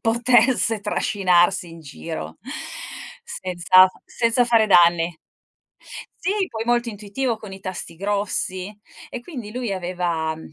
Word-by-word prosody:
potesse 235 -1 +3
trascinarsi 185 -3 +2
in 165 0 -11
giro, 80 - -7 0.9
senza 185 +1 +4 0.2
senza 235 +1 +1
fare 230 -2 +4
danni. 170 -3 +4 1.1
Sì, 390 +1 0
poi 225 -5 -4
molto 240 0 +1
intuitivo 220 +3 -3
con 215 -3 -10
i 190 - -9
tasti 185 -3 -6
grossi, 200 0 -3 0.3
e 250 - -6
quindi 240 -7 -8
lui 240 -4 -3
aveva, 175 -3 -2
uhm, 160 - -12
200 Hz, 120 wpm, -22 LUFS, 175-230 Hz, 1.1 s, senza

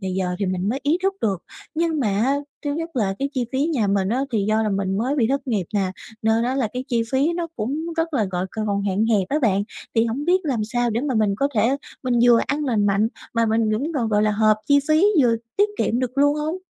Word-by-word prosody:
thì 190 - -4
giờ 180 -1 -1
thì 200 - -1
mình 185 +1 -1
mới 265 +5 -1
ý 305 +5 +2
thức 390 0 +1
được, 195 -5 -1 0.3
nhưng 325 -2 0
mà 230 +4 +1 0.3
thứ 290 - 0
nhất 330 -2 -5
là 195 -4 +1
cái 275 +1 -1
chi 250 -2 0
phí 275 +4 +1
nhà 265 -11 0
mình 195 -1 +1
á, 245 +4 0
thì 205 -3 +1
do 220 +1 +2
là 215 - 0
mình 195 0 -1
mới 260 +6 0
bị 230 -5 +3
thất 275 0 -1
nghiệp 205 -8 -1
nè, 190 -2 +1 0.3
nên 220 +1 +2
á 255 +2 0
là 255 -6 0
cái 250 +1 -4
chi 235 -2 +1
phí 285 +6 +2
nó 340 -1 -2
cũng 295 +10 -3
rất 325 -1 -1
là 225 -6 +2
gọi 180 +1 -2
c - - -23 0.2
còn 200 -1 0
hạn 200 +2 0
hẹp 205 -5 +1
á 300 - +1
bạn, 200 -3 +2 0.3
thì 225 0 +4
hổng 260 +6 -3
biết 365 +2 +3
làm 245 -7 0
sao 240 +1 0
để 225 - -1
mà 275 -1 -1
mình 215 -3 +2
có 280 +5 +1
thể 230 +6 +2 0.3
mình 255 -1 0
vừa 235 -1 +6
ăn 295 +1 -1
lành 220 -6 +1
mạnh 205 +2 +2 0.3
mà 230 0 +2
mình 220 0 +1
cũng 275 +10 -1
còn, 235 -5 0
gọi 210 -1 +2
là, 215 - +3
hợp 215 0 +3
chi 285 - +5
phí, 310 +5 +4 0.2
vừa 235 -2 +3 0.2
tiết 410 +1 +4
kiệm 235 - +1
được 255 +1 -3
luôn 290 +1 +4
hông? 310 +4 -2
230 Hz, 270 wpm, -22 LUFS, 210-280 Hz, 0.3 s, vừa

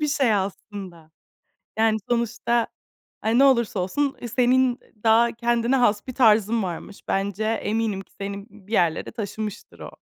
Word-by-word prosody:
bir 300 - 0
şey 270 -7 +2
aslında. 190 -4 -5 0.7
Yani, 220 -1 +3
sonuçta 235 0 0 0.6
e, 225 +3 +2
ne 275 - +7
olursa 235 -7 +3
olsun 270 +9 -1 0.2
senin 255 0 +3 0.2
daha 230 +1 +5
kendine 235 +2 +1
has 215 -4 +2
bir 255 - -6
tarzın 220 -2 +4
varmış. 185 +2 -6
Bence 200 +2 -1
eminim 220 -2 -1
ki 195 - -15
seni 200 +1 -5
bir 205 +1 -16
yerlere 170 -6 +1
taşımıştır 210 -1 -6
o. - - -10
220 Hz, 140 wpm, -24 LUFS, 200-240 Hz, 0.7 s, ne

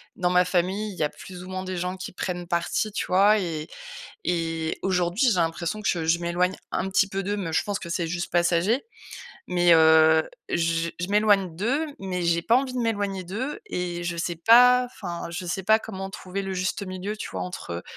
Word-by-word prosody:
dans 180 -1 0
ma 180 0 +4
famille, 190 +4 0
il - - -10
y - - +2
a 150 - +1
plus 180 +3 -11
ou 185 - -10
moins 185 0 -4
des 185 -1 -4
gens 180 +2 -3
qui 185 - -7
prennent 180 -1 -4
partie, 170 +5 -1
tu - - -3
vois? 200 +3 +5
Et 160 -4 -4 0.6
et 165 -2 -1
aujourd'hui, 185 +6 +1
j'ai 185 - 0
l'impression 175 +6 -4
que 175 -5 0
je 165 +1 +3
m'éloigne 180 +2 0 0.2
un 190 - -1
petit 195 +1 +3
peu 195 -1 -3
d'eux. 205 +2 -2
Mais 180 -6 -4
je - - +2
pense 205 -1 -3
que 170 - -8
c'est 170 -1 -1
juste 175 +1 -4
passager. 175 - +2 0.6
Mais, 175 -1 +4
heu, 160 0 +6 0.2
j 165 0 0
je 180 - -3
m'éloigne 205 -4 +3
d'eux, 265 - 0
mais 185 -2 -3
j'ai 170 0 +2
pas 230 +6 +4
envie 260 -1 0
de - - -2
m'éloigner 205 -5 -1
d'eux 255 - -4
et 175 - -3
je 170 -1 -3
sais 170 +1 -2
pas, 250 +7 +6
enfin, 175 -8 -6
je 180 +2 -5
sais 185 +2 -2
pas 220 +2 +5
comment 195 -3 -6
trouver 195 -1 -5
le 195 0 -4
juste 185 +2 -2
milieu, 185 +3 -5
tu - - -5
vois? 95 - -4
Entre, 90 -1 -6
heu, 85 - -5
180 Hz, 215 wpm, -25 LUFS, 170-200 Hz, 0.6 s, heu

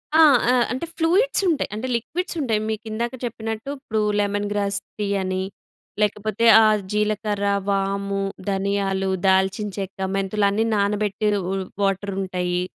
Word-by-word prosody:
ఆ! - - +6 0.3
ఆ! - - +6 0.2
అంటే 260 +6 -2
ఫ్లూయిడ్స్ 370 +11 +2
ఉంటాయి. 315 -4 0
అంటే 225 +5 -4
లిక్విడ్స్ 335 +11 -3
ఉంటాయి. 225 -6 +1
మీకు 220 +1 -4
ఇందాక 235 +3 -2
చెప్పినట్టు. 225 +1 -5
ఇప్పుడు 220 -5 -2 0.2
లెమన్ 205 0 0
గ్రాస్ 200 -1 0 0.2
టీ 205 - 0
అని, 185 0 -2 0.6
లేకపోతే 210 +2 0 0.2
ఆహ్, 215 -1 +4
జీలకర్ర, 210 -1 0 0.2
వాము, 200 0 -1 0.3
ధనియాలు, 195 0 0 0.2
దాల్చిన 190 +2 +2
చెక్క, 195 -1 -5 0.2
మెంతులు 195 +1 0
అన్నీ 215 +3 +1
నానబెట్టిరు 205 0 +1 0.4
వాటర్ 195 0 0
ఉంటాయి, 180 -1 -1
205 Hz, 130 wpm, -23 LUFS, 195-220 Hz, 0.6 s, ఆ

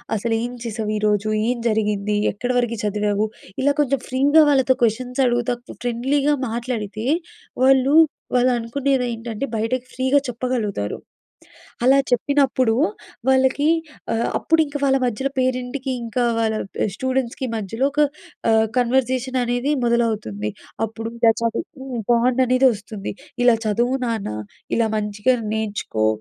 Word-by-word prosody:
అసలు 225 +2 -1
ఏం 245 - -3
చేసావు, 220 -2 -3
ఈరోజు 210 0 +1 0.2
ఏం 250 +1 0
జరిగింది, 210 -1 0 0.2
ఎక్కడ 245 +5 -5
వరకు 235 -1 -1
చదివావు 210 0 0 0.4
ఇలా 285 +2 +3
కొంచెం 275 -2 0
ఫ్రీగా 280 +5 +5
వాళ్ళతో 265 -2 +3
క్వశ్చన్స్ 250 +3 0
అడుగుతా, 240 0 +1 0.3
ఫ్రెండ్లీగా 270 +5 +1 0.2
మాట్లాడితే. 225 -2 -4 0.6
వాళ్ళు 265 +1 +4 0.4
వాళ్ళనుకునేది 250 +2 +1
ఏంటంటే, 230 +2 -4
బయటకి 235 +3 -1
ఫ్రీగా 260 +2 +2
చెప్పగలుగుతారు. 235 - -2 0.9
అలా 265 +2 +6
చెప్పినప్పుడు 260 -2 +2 0.5
వాళ్ళకి 265 +2 +3 0.5
ఆహ్, 225 +1 0
అప్పుడింక 315 -3 +1
వాళ్ళ 270 -1 +4
మధ్యలో 250 +3 -1
పేరెంట్‌కి 255 +1 -1
ఇంకా 235 +2 -1 0.2
వాళ్ళ 220 -1 +1 0.4
స్టూడెంట్స్‌కి 260 +1 -2
మధ్యలో 225 +4 -2
ఒక 295 - 0 0.5
ఆహ్, 220 0 +4
కన్వర్జేషన్ 255 +1 +1
అనేది 245 +3 -1
మొదలవుతుంది. 215 - 0 0.4
అప్పుడు 225 +1 -6
ఇలా 230 -1 +5
చదువు 265 +4 -3 0.2
బాండ్ 240 +2 +3
అనేది 255 +2 +4
వస్తుంది. 205 0 -7 0.3
ఇలా 240 -2 +6
చదువు 240 +5 +1
నాన్న, 225 -3 -2 0.5
ఇలా 230 -1 +2
మంచిగా 210 +4 +1 0.2
నేర్చుకో. 205 - -1
240 Hz, 120 wpm, -21 LUFS, 220-260 Hz, 0.9 s, అలా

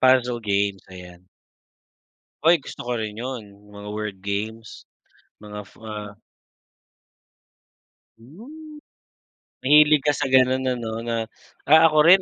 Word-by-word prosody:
Puzzle 125 -2 +3
games, 100 -2 -1
ayan. 90 -1 -13 1.2
Uy, 170 +1 +6
gusto 140 - -10
ko 120 0 -3
rin 110 0 -5
yun, 105 -5 -8
mga 105 0 -10
word 105 -2 -5
games, 105 +3 -6 0.5
mga 105 0 -10
af - - -21
ah 105 -2 -7 2.1
Mm. 295 - -13 0.8
Mahilig 150 +1 +5
ka 145 - +3
sa 135 - -2
ganun 130 0 +3
ano, 115 -3 -3
na 115 0 -3 0.5
ako 160 +1 +5
rin 185 +3 +7
115 Hz, 115 wpm, -23 LUFS, 105-140 Hz, 2.1 s, rin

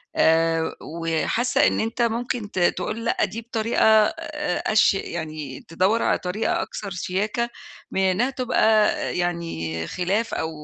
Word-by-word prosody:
آآ، 165 0 +2
وحاسة 165 +9 +1
إن - - 0
أنت 225 +2 -2
ممكن 235 -1 -1
ت 185 - -3
تقُول 215 +6 0
لأ - - +2
دي 230 - -6
بطريقة 230 0 -1 0.2
آآ، 300 -1 -3
أش 215 - +5
يعني 155 -7 -5
تدوّر 190 +7 +1
على - - +2
طريقة 225 - -1
أكثر 200 -10 -6
شياكة 210 +6 -2 0.4
من 190 - 0
إنها 190 +7 +2
تبقى 220 -4 +3 0.2
يعني 165 - -2
خلاف 195 +6 -1
أو 160 - -1
200 Hz, 135 wpm, -23 LUFS, 170-230 Hz, 0.4 s, أش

